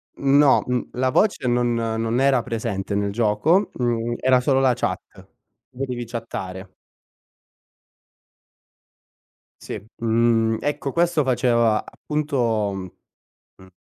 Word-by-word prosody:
Mhmm, 140 0 +2
no, 145 -2 +5
mhmm, 125 -1 -2
la 130 +1 0
voce 190 -4 +1
non 120 0 +1
non 115 +1 -1
era 135 -3 +3
presente 110 -4 -3
nel 100 0 0
gioco, 120 - +2
mhmm, 120 -1 -1
era 130 0 +4
solo 135 0 +2
la 130 -2 +3
chat. 95 -6 -2 0.7
Potevi 125 -2 -4
chattare. 95 -5 -7 2.9
Sì, - - -6 0.2
mhmm, 115 0 +2
ecco 145 -1 -2
questo 170 -2 +1
faceva 120 -4 +2
appunto, 125 -9 -1
mhmm, 95 -1 -6 0.7
mhmm 95 0 -17
120 Hz, 115 wpm, -22 LUFS, 110-135 Hz, 2.9 s, no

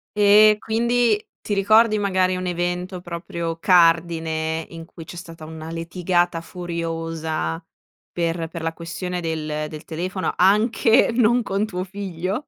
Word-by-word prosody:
E 210 +1 +6
quindi 230 -1 +1 0.2
ti 205 - -3
ricordi 215 +2 +4
magari 185 -2 +1
un 185 0 -4
evento, 180 +1 -3
proprio 170 -1 -5
cardine, 165 -2 +2
in 165 -1 -9
cui 165 -2 -12
c'è - - -10
stata 165 -2 -10
una 160 0 -8
litigata 175 +1 -1
furiosa 165 -2 -4 0.5
per 165 -1 -2
per 165 +1 -7
la 165 0 -2
questione 180 +2 -5
del 155 -2 -3
del 155 0 -9
telefono, 180 +4 -3
anche 220 +4 +4
non 240 0 +3
con 200 +1 -1
tuo 180 -3 -4
figlio? 195 - -4
175 Hz, 135 wpm, -22 LUFS, 165-200 Hz, 0.5 s, E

